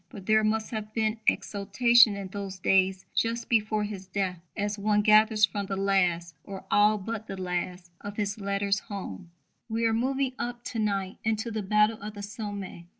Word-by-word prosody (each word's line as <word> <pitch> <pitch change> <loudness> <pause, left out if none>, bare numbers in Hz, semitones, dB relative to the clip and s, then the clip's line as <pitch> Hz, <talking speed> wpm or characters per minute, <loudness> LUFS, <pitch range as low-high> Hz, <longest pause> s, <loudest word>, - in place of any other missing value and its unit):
But 205 -8 -10
there 215 +1 +4
must 220 0 0
have 215 -2 -5
been 220 0 0
exaltation 220 +2 +4
in 200 -1 -6
those 195 -1 -6
days 190 0 +2
just 230 +1 0
before 215 -2 +1
his 200 -3 -6
death, 185 -2 -2 0.2
as 205 0 -2
one 210 0 +2
gathers 215 0 +6
from 200 -1 -4
the 195 - -2
last, 180 -3 +1
or 195 -1 -8
all 210 +1 +5
but 220 +2 -5
the 195 - -6
last, 180 0 -4
of 205 0 -7
his 205 0 -2
letters 200 +1 0
home: 185 - -7 0.4
We 225 +1 0
are 225 - +3
moving 265 +3 0
up 240 0 -4
to 230 - -4
night 200 -3 -1
into 220 +1 -1
the 215 -1 -2
battle 210 +2 +2
of 210 +1 -7
the 205 - -7
Somme. 200 -4 -6
205 Hz, 185 wpm, -28 LUFS, 195-220 Hz, 0.4 s, gathers